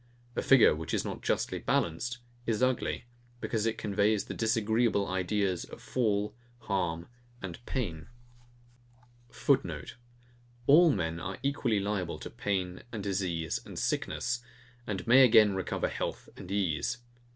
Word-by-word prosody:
A -, -, 0 dB
figure, 135 Hz, -4 st, +6 dB
which 80 Hz, +1 st, -3 dB
is -, -, -1 dB
not -, -, -5 dB
justly -, -, 0 dB
balanced, 115 Hz, +10 st, 0 dB, 0.3 s
is 115 Hz, +1 st, +1 dB
ugly; 130 Hz, -1 st, 0 dB, 0.3 s
because 115 Hz, -2 st, -1 dB
it 115 Hz, -, -1 dB
conveys 105 Hz, 0 st, +1 dB
the -, -, -5 dB
disagreeable 110 Hz, -1 st, +1 dB
ideas 95 Hz, 0 st, 0 dB
of -, -, -11 dB
fall, 105 Hz, -4 st, 0 dB, 0.3 s
harm, 85 Hz, -5 st, -1 dB, 0.3 s
and 95 Hz, +4 st, -7 dB
pain. 85 Hz, -, -3 dB, 1.2 s
[Footenote: 135 Hz, +2 st, 0 dB, 0.7 s
All 165 Hz, +6 st, +7 dB
men 85 Hz, -7 st, -1 dB
are 95 Hz, +2 st, -5 dB
equally 135 Hz, -6 st, +1 dB
liable 100 Hz, -4 st, -2 dB
to -, -, -8 dB
pain 95 Hz, -3 st, -2 dB
and 110 Hz, -4 st, -5 dB
disease 90 Hz, -5 st, -1 dB
and -, -, -10 dB
sickness; 120 Hz, -1 st, -1 dB, 0.5 s
and 95 Hz, -4 st, -3 dB
may 130 Hz, +3 st, +8 dB
again 110 Hz, -4 st, +7 dB
recover 95 Hz, -1 st, -1 dB
health -, -, -4 dB
and 90 Hz, -, -10 dB
ease. 100 Hz, +2 st, 0 dB
105 Hz, 135 wpm, -30 LUFS, 95-115 Hz, 1.2 s, may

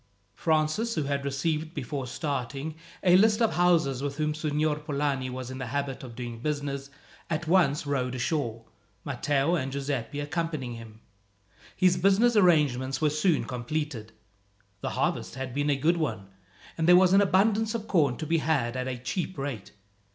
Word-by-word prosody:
Francis, 160 Hz, +9 st, 0 dB
who 155 Hz, -, 0 dB
had 140 Hz, 0 st, -2 dB
received 155 Hz, +4 st, -2 dB
before 135 Hz, -1 st, -4 dB
starting 140 Hz, +2 st, -3 dB, 0.3 s
a 180 Hz, -1 st, +6 dB
list 215 Hz, +3 st, +5 dB
of 230 Hz, -2 st, +2 dB
houses 165 Hz, -7 st, +2 dB
with 140 Hz, 0 st, -3 dB
whom 150 Hz, 0 st, 0 dB
Signor 150 Hz, 0 st, 0 dB
Polani 140 Hz, -3 st, -1 dB
was 130 Hz, 0 st, -6 dB
in 130 Hz, -, -7 dB
the 130 Hz, -, -4 dB
habit 140 Hz, +1 st, -3 dB
of 120 Hz, -3 st, -9 dB
doing 120 Hz, -1 st, -6 dB
business, 140 Hz, 0 st, -3 dB, 0.4 s
at 160 Hz, 0 st, -2 dB
once 155 Hz, -5 st, +3 dB
rowed 130 Hz, -3 st, -1 dB
ashore, 125 Hz, -4 st, -2 dB, 0.4 s
Matteo 145 Hz, +3 st, 0 dB
and 135 Hz, -6 st, -1 dB
Giuseppi 140 Hz, -1 st, -3 dB
accompanying 150 Hz, -4 st, -3 dB
him. 115 Hz, -1 st, -11 dB, 0.7 s
His 180 Hz, -1 st, +3 dB
business 200 Hz, +6 st, +4 dB
arrangements 145 Hz, -9 st, +3 dB
were 155 Hz, -2 st, +2 dB
soon 155 Hz, +2 st, +2 dB
completed. 125 Hz, -2 st, -4 dB, 0.7 s
The -, -, -3 dB
harvest -, -, -1 dB
had 130 Hz, -2 st, -5 dB
been 145 Hz, +2 st, 0 dB
a 145 Hz, -, +3 dB
good 160 Hz, +5 st, +2 dB
one, 120 Hz, -, -3 dB, 0.5 s
and 160 Hz, -, +1 dB
there 180 Hz, -, +8 dB
was 185 Hz, 0 st, +5 dB
an 195 Hz, -, +7 dB
abundance 210 Hz, +3 st, +2 dB
of 220 Hz, -1 st, -4 dB
corn 145 Hz, -, +2 dB
to 155 Hz, -, -4 dB
be 165 Hz, +2 st, +1 dB
had 140 Hz, -7 st, 0 dB
at 130 Hz, 0 st, -2 dB
a 130 Hz, -1 st, -3 dB
cheap 130 Hz, +9 st, -4 dB
rate. 135 Hz, -7 st, -5 dB
145 Hz, 170 wpm, -27 LUFS, 130-165 Hz, 0.7 s, there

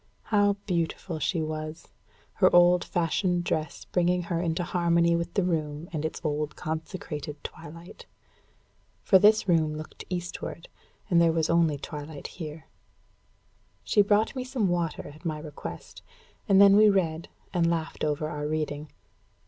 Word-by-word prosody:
How 205 Hz, -1 st, +4 dB
beautiful 170 Hz, -2 st, -2 dB
she 160 Hz, +2 st, 0 dB
was! 155 Hz, 0 st, -6 dB, 0.4 s
her -, -, +4 dB
old 175 Hz, 0 st, +6 dB
fashioned 175 Hz, +1 st, 0 dB
dress 155 Hz, -3 st, -3 dB
bringing 180 Hz, 0 st, +1 dB
her 170 Hz, -1 st, -2 dB
into 170 Hz, 0 st, -1 dB
harmony 170 Hz, -1 st, +2 dB
with 170 Hz, 0 st, -3 dB
the 195 Hz, -, +2 dB
room 155 Hz, -2 st, -2 dB
and 155 Hz, -2 st, -2 dB
its 160 Hz, -, -3 dB
old 150 Hz, -1 st, -2 dB
consecrated 155 Hz, -2 st, -5 dB
twilight! 165 Hz, +3 st, -10 dB, 1.0 s
For 190 Hz, -, +6 dB
this 210 Hz, +1 st, +5 dB
room 160 Hz, -3 st, +2 dB
looked 155 Hz, -, -9 dB
eastward, 175 Hz, -1 st, -5 dB, 0.4 s
and 170 Hz, -1 st, +5 dB
there 165 Hz, -1 st, +5 dB
was 160 Hz, 0 st, 0 dB
only 165 Hz, -3 st, +3 dB
twilight 145 Hz, 0 st, -8 dB, 0.2 s
here. 155 Hz, 0 st, -7 dB, 1.2 s
She 210 Hz, -, +4 dB
brought 205 Hz, +4 st, +2 dB
me 255 Hz, -, -2 dB
some 250 Hz, -6 st, -1 dB
water, 170 Hz, -3 st, -2 dB
at 150 Hz, +3 st, -13 dB
my 160 Hz, -3 st, -2 dB
request; 150 Hz, -, -9 dB, 0.5 s
and 195 Hz, -1 st, +6 dB
then 200 Hz, 0 st, +8 dB
we 215 Hz, 0 st, +7 dB
read, 170 Hz, -5 st, 0 dB, 0.2 s
and 170 Hz, -2 st, +2 dB
laughed 165 Hz, -1 st, -3 dB
over 155 Hz, 0 st, 0 dB
our 150 Hz, -1 st, -4 dB
reading. 150 Hz, -1 st, -3 dB
165 Hz, 150 wpm, -27 LUFS, 155-180 Hz, 1.2 s, then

